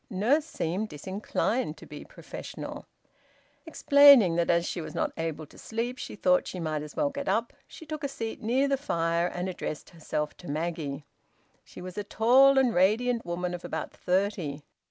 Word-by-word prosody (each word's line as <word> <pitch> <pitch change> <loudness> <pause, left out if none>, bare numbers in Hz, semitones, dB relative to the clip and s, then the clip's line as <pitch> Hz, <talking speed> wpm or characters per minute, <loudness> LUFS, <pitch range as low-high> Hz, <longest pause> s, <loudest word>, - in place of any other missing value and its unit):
Nurse 245 +10 +2
seemed 190 - -3
disinclined 190 - -2
to - - -12
be - - -9
professional. - - -9 0.8
Explaining 280 - +7
that 170 0 +1
as 170 0 +3
she 175 - -3
was - - -8
not - - 0
able 160 -1 -4
to - - -17
sleep 235 +3 -4
she - - -6
thought 180 -2 +2
she 185 - -6
might 155 -3 -2
as 150 0 -9
well 285 -1 +1
get 280 0 -4
up, 230 +1 0
she 320 - -12
took 305 -1 -6
a - - +1
seat 225 -5 -6
near 255 +5 +2
the 275 0 +1
fire 170 - 0
and 180 +1 -4
addressed 170 -4 -5
herself 150 -2 -4
to 175 - -10
Maggie. 155 -2 -3 0.6
She - - -12
was 185 +2 -6
a - - -2
tall 260 +6 +5
and 255 -3 +4
radiant 225 +5 +2
woman 175 +1 -2
of 175 - -6
about - - -4
thirty. 180 -6 -1
190 Hz, 180 wpm, -28 LUFS, 170-245 Hz, 0.8 s, Explaining